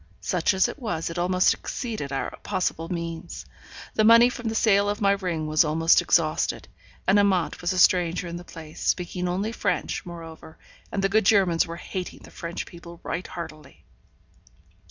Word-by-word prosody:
Such 180 +2 0
as 190 - +4
it - - -7
was, 165 -10 -3
it 170 - -4
almost 180 +1 +3
exceeded 220 - -5
our 135 - -3
possible 180 -4 -2
means. 170 -2 -5 0.5
The 215 - +2
money 230 +2 +7
from 240 -2 -6
the 220 - -4
sale 205 -2 +3
of 205 - -2
my 200 -1 +3
ring 180 -5 -1
was 155 +2 +3
almost 165 +2 +4
exhausted, 155 -2 +1 0.4
and 200 +2 +4
Amante 190 -4 +1
was 175 +1 0
a 185 - -2
stranger 175 -1 +3
in 170 0 -5
the 175 - -9
place, 160 -3 -11
speaking 180 0 -1
only 195 +5 -1
French, 200 -7 -2
moreover, 165 -2 -10 0.3
and 195 - -2
the 195 - +3
good 215 0 +2
Germans 185 -6 +4
were 165 - -6
hating 180 +1 -6
the - - -14
French 170 0 -5
people 170 -1 -12
right 175 +2 -4
heartily. 160 -3 -9
180 Hz, 175 wpm, -25 LUFS, 165-200 Hz, 0.5 s, money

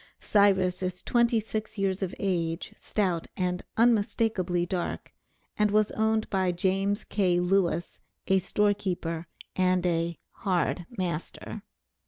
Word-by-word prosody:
Cyrus 190 -3 +3
is 185 0 -3
twenty 235 -1 +3
six 220 0 -5
years 195 -1 0
of 190 -1 -2
age, 170 -4 -1
stout, 185 -6 -1
and 180 -1 -1 0.2
unmistakably 210 -6 +2
dark, 175 0 -4 0.5
and 210 0 +4
was 215 0 +3
owned 220 0 +1
by 190 -2 +2
James 195 +4 0
K. 180 -4 +1
Lewis, 175 -2 0 0.2
a 190 0 +3
store 205 +2 +2
keeper, 175 -4 -3 0.3
and 185 -1 +2
a 170 -1 0
"hard 175 -2 -1
master." 175 -3 -4
190 Hz, 125 wpm, -28 LUFS, 175-205 Hz, 0.5 s, and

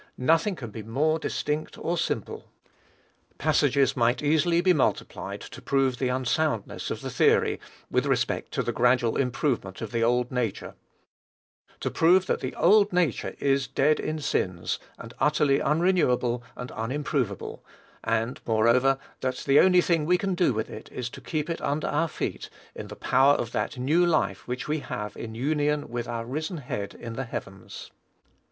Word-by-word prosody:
Nothing 165 +9 +2
can 120 -8 -8
be 110 - -7
more 145 +9 0
distinct 150 0 -3
or 170 - -1
simple. - - -3 0.9
Passages 140 -1 +2
might 120 +2 +1
easily 160 +3 +3
be 180 +1 +4
multiplied 150 - -1
to - - -10
prove 135 -2 +1
the 130 - +1
unsoundness 130 -1 -1
of - - -4
the - - -5
theory, - - +3 0.3
with - - +1
respect - - 0
to - - 0
the - - -1
gradual 120 -1 +2
improvement 125 -7 -1
of 110 -2 -5
the 115 -1 0
old 125 +1 +1
nature, 125 -5 -2 1.1
to - - -2
prove 180 +3 +4
that - - 0
the - - -5
old 205 +3 +5
nature 175 -8 0
is 135 -1 +1
dead 140 +4 +2
in 155 - -2
sins, 90 - -1 0.2
and 115 +1 -10
utterly 150 0 +3
unrenewable 150 -8 +2
and 125 0 -7
unimproveable; 125 - -3 0.4
and, 115 +2 -1
moreover, 120 +4 +3 0.2
that 130 -1 -1
the 140 +1 +5
only 180 -1 +6
thing 165 -4 +1
we 180 +1 +4
can 195 0 -1
do 175 -5 +2
with 110 -1 -2
it - - -10
is, 125 -1 -5
to - - -10
keep 155 -2 -3
it 170 - -3
under 145 +2 -1
our 165 +3 +1
feet - - -4 0.2
in - - -7
the - - -9
power 140 +2 +4
of 115 - -3
that - - -2
new 150 +8 +2
life 155 - 0
which 125 +1 -4
we 155 +1 0
have 105 -6 -5
in 110 -1 -7
union 150 +3 0
with 120 0 -4
our 115 -1 -4
risen 155 +8 -4
Head 105 -8 -5
in 115 -1 -7
the 135 +3 -4
heavens. 95 -4 -8
135 Hz, 170 wpm, -26 LUFS, 120-155 Hz, 1.1 s, only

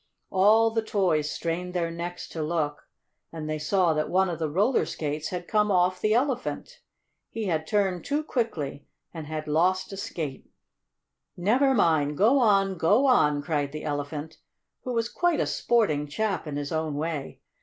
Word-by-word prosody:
All 215 +4 +5
the 225 0 0
toys 180 -9 0
strained 180 +3 -3
their 170 -1 0
necks 175 +1 -6
to 160 - -5
look, 150 -2 -2 0.4
and 160 -2 -6
they 155 0 -2
saw 170 +2 +2
that 155 0 -1
one 190 0 +2
of 165 - -5
the 160 -2 -1
roller 205 - +2
skates 150 0 -3
had 175 -1 -5
come 210 -1 +2
off 180 -1 +2
the 215 +1 +2
Elephant. 255 0 -2 0.5
He 225 -1 -4
had 160 -4 -1
turned 195 -3 0
too 295 +2 -1
quickly, 155 - -3 0.3
and 160 -3 -7
had 155 0 -5
lost 180 +6 +1
a - - -6
skate. 160 -8 -5 0.9
"Never 255 +9 +3
mind! 155 -7 +2
Go 235 +8 +4
on! 195 -6 +3
Go 210 +12 +4
on!" 150 - +3
cried 145 -2 -1
the 155 +1 -6
Elephant, 145 +1 -4 0.4
who 250 - -3
was 230 -1 0
quite 350 +4 0
a - - +2
sporting 155 -12 +1
chap 195 +2 -2
in 145 - -4
his 145 0 -4
own 160 -2 -2
way. 150 -2 -4
175 Hz, 175 wpm, -26 LUFS, 155-210 Hz, 0.9 s, All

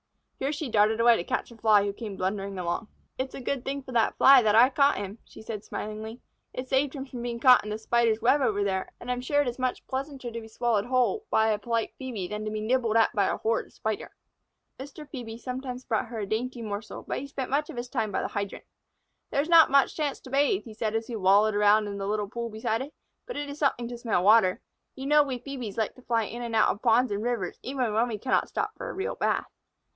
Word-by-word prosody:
Here 270 +2 -1
she 305 0 -4
darted 215 0 +3
away 235 0 +6
to - - -3
catch - - -3
a - - -12
Fly 215 -3 +4
who 200 0 -2
came 210 -2 -7
blundering 195 +1 -2
along. 175 +4 -2 0.3
"It's 260 0 -3
a - - -6
good 260 0 -3
thing 275 0 -4
for 260 - -10
that 230 -2 +1
Fly 270 -1 +8
that 215 -2 +3
I 240 +3 +7
got 280 +1 +3
him," 205 +2 -6
she - - -14
said, 220 -2 -6
smilingly. 220 +2 -6 0.3
"It 255 +1 -6
saved 270 +2 +1
him 270 -1 -5
from 255 -3 -8
being 235 -1 -4
caught 250 0 +7
in 210 - -6
the 210 - -2
Spider's 225 0 +1
web 275 +4 +4
over 205 -5 +1
there, 190 -1 -2
and 250 - -5
I - - +3
am 245 - -4
sure 290 +3 +2
it - - -5
is 245 +1 -4
much 255 -1 -2
pleasanter 265 -2 -5
to 230 0 -5
be 220 - -11
swallowed 225 -2 0
whole 255 - +1
by 220 0 +3
a 210 -1 +1
polite 230 +1 -2
Phœbe 230 -8 -4
than 210 +2 -5
to 215 - -3
be 215 0 -3
nibbled 230 0 +1
at 225 - +3
by 200 -4 +2
a - - -1
horrid 225 +1 -1
Spider." 220 -1 -4 0.6
Mr. 285 +3 -9
Phœbe 235 -5 -7
sometimes 255 0 -5
brought 220 -4 -1
her 230 - -7
a 210 - -2
dainty 235 +4 -3
morsel, 210 0 -6
but - - -2
he 280 - -7
spent 270 -2 -5
much 295 +3 0
of 300 - -8
his 240 +1 -4
time 225 -4 -2
by - - -1
the - - -1
hydrant. 200 -1 -5 0.6
"There 280 - +1
is 310 - -8
not 330 -2 +8
much 275 0 +3
chance 295 -3 -2
to 260 - -12
bathe," 290 +8 +2
he 225 - -10
said, 215 0 -2
as 225 0 -1
he 235 - -6
wallowed 205 +2 +4
around 210 +1 +4
in 200 -1 -5
the 195 - -3
little 210 0 -1
pool 235 +3 -5
beside 220 +1 -2
it, 285 +3 -8 0.3
"but - - -6
it 290 0 -3
is 285 +1 -8
something 255 -5 +1
to 240 - -6
smell 225 -7 0
water. 200 -2 +5 0.3
You 265 - -7
know 295 +1 +5
we 270 -3 -2
Phœbes 250 -6 -6
like 220 -2 0
to 255 - -17
fly 230 -2 0
in 235 +3 -6
and 235 -1 -4
out 220 - +5
of 205 - -2
ponds 245 +1 +3
and 200 0 -1
rivers, 230 -6 -2
even 255 -4 -2
when 225 +3 +2
we 225 -3 -3
cannot 255 +5 0
stop 435 - -2
for - - -6
a - - -5
real 385 +2 -3
bath." - - 0
235 Hz, 260 wpm, -27 LUFS, 215-265 Hz, 0.6 s, Fly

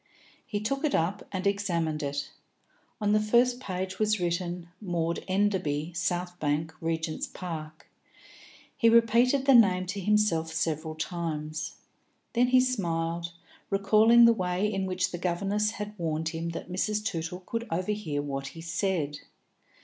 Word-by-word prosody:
He 210 -5 -2
took 275 +7 -2
it 305 - +2
up 180 +5 -1
and 190 -1 -3
examined 170 -6 0
it. 145 0 -3 0.7
On 205 -1 +1
the 215 - +4
first 240 +3 +3
page 185 -5 -4
was 215 -1 +2
written 175 0 -2
"Maud 170 -4 -1
Enderby, 185 -5 0
South 175 +2 -2
Bank, 155 +2 -1
Regent's 160 -1 -2
Park." 155 -4 -7 0.9
He 230 -4 +4
repeated 235 +4 +4
the 275 - +6
name 190 -6 +5
to 200 +2 -4
himself 195 -5 +2
several 155 0 -2
times. 155 -2 -4 0.6
Then 245 +1 +3
he 255 0 +5
smiled, 170 -8 -1 0.4
recalling 215 +4 +6
the 230 - +7
way 185 -1 -1
in 195 -2 -1
which 185 +1 0
the 175 - -5
governess 195 +4 0
had 210 -1 -5
warned 160 -1 -1
him 165 +1 -4
that 170 +1 -6
Mrs. 210 +3 -1
Tootle 170 -1 -3
could 230 +5 -4
overhear 175 -4 -2
what 135 -1 -4
he - - -7
said. 165 -4 -1
180 Hz, 145 wpm, -28 LUFS, 165-210 Hz, 0.9 s, the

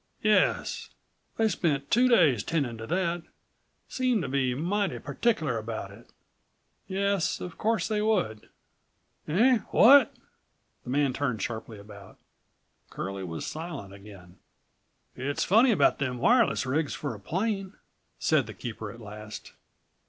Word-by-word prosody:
"Yes. 215 -1 +1 0.5
They 225 - +3
spent 145 -9 -1
two 245 +3 +5
days 150 - +4
tending 140 -8 -1
to 115 - -7
that; 175 0 -1 0.7
seemed 250 -7 0
to - - -3
be 130 -2 0
mighty 195 +8 -1
particular 155 - -1
about 110 +1 -6
it." - - -16 0.8
"Yes, 195 -2 0
of 180 -2 -8
course 220 -4 +1
they 210 -1 0
would." 185 - -1 0.8
"Eh? 230 +10 +4
What?" 275 +5 +6 0.7
the - - -10
man 140 0 +1
turned 125 -7 -2
sharply 110 -1 -5
about. 100 -1 -13 0.7
Curlie 95 0 -5
was 80 -3 -5
silent 155 - -6
again. 100 -3 -14 0.8
"It's 140 +3 -2
funny 225 +7 +5
about 225 - +3
them 130 -3 -2
wireless 235 - +3
rigs 145 +4 -1
for 145 -4 -4
a 105 - -10
plane," 195 - -2 0.4
said 150 -7 +2
the 110 - -9
keeper 110 0 -6
at 115 - -13
last. 105 0 -9
145 Hz, 135 wpm, -27 LUFS, -, 0.8 s, What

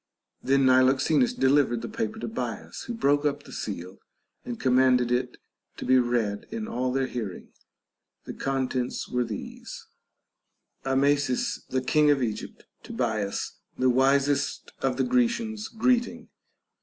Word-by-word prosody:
Then 135 0 +3
Niloxenus 130 - +4
delivered 135 - +2
the - - -3
paper 220 0 -3
to - - -4
Bias, 225 - -5
who 240 - -4
broke 145 -8 +2
up 145 -1 -1
the - - -13
seal 90 +3 -6 0.4
and 120 -1 -6
commanded 125 -1 +3
it 125 0 -1 0.4
to - - -6
be 130 0 +5
read 120 -4 -1
in 220 -1 -5
all 125 - -1
their 135 +1 +1
hear 115 -6 -4
ing. - - -13 0.7
The - - -7
contents 130 -2 -2
were 125 0 0
these: 110 -4 -7 0.5
— - - -44
Amasis 145 - +1
the 130 0 -1
king 150 +3 +3
of 140 -3 +3
Egypt, 110 -3 -5 0.2
to - - -10
Bias, 110 -4 -2 0.2
the 130 0 +3
wisest 140 +2 +1
of 130 -1 0
the - - +2
Grecians, 235 -3 0
greeting. 240 +1 0
135 Hz, 145 wpm, -26 LUFS, 125-155 Hz, 0.7 s, be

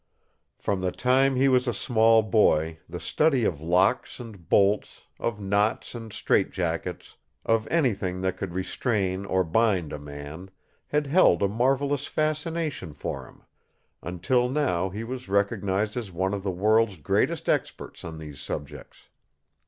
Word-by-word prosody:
From 100 -2 -2
the 90 -1 0
time 130 +4 +2
he 135 +2 +3
was 130 -1 +3
a 120 - 0
small 115 -1 +4
boy 80 -7 +2
the 90 +1 -6
study 135 - +2
of 75 -7 -1
locks 90 +12 +1
and 110 -8 -11
bolts, 100 +1 +2 0.2
of 110 -3 -2
knots 100 +2 0
and 115 -2 -8
strait - - +1
jackets, - - -4 0.3
of 115 -1 +1
anything 100 - 0
that 95 -1 0
could 95 -2 -5
restrain 95 0 -1
or 95 0 +2
bind 90 -2 +1
a 75 - -5
man, 75 +5 -9 0.4
had 150 0 0
held 140 - +4
a - - +4
marvelous 135 +6 0
fascination 155 - -2
for - - -5
him, - - -19 0.6
until 110 +9 0
now 125 -11 0
he 105 +5 -5
was 125 -2 -6
recognized 100 0 0
as 115 -6 -4
one 95 +3 -1
of 100 - -2
the 100 - -2
world's 105 +2 +2
greatest 75 - 0
experts - - -2
on 80 -1 -7
these 75 -3 -9
subjects. 75 -1 -7
100 Hz, 150 wpm, -26 LUFS, 90-125 Hz, 0.6 s, small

